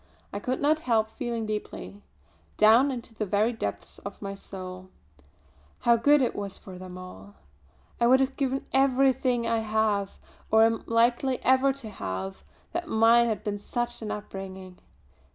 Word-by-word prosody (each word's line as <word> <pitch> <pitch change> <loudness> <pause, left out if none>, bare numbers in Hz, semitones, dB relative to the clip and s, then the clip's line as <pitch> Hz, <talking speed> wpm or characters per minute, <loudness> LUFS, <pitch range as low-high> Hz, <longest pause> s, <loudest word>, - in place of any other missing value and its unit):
I 200 - -3
could 255 +5 -2
not 305 +2 +2
help 225 -6 +1
feeling 235 -4 -3
deeply 210 -1 -6 0.6
down 225 +6 +6
into 240 -3 -5
the 215 - -3
very 210 +4 +1
depths 100 - -5
of 200 0 -8
my 195 -1 -5
soul 185 -1 -9 0.9
how 235 - +5
good 285 +4 +4
it 245 - -1
was 200 -1 -5
for 185 -2 -11
them 185 -1 -9
all. 100 - -11 0.6
I 235 - +4
would 260 +2 +6
have 270 0 0
given 270 -1 -1
everything 265 -2 +3
I 230 0 +1
have, 215 -2 0 0.4
or 220 0 +6
am 225 0 +4
ever 225 - -6
likely 240 +3 +2
to 265 -1 +2
have, 95 - -5 0.3
that 345 0 -3
mine 230 +1 +5
had 220 -2 -2
been 205 -1 -3
such 240 +3 -3
an 215 - -5
upbringing. 190 -3 -7
225 Hz, 160 wpm, -27 LUFS, 200-250 Hz, 0.9 s, down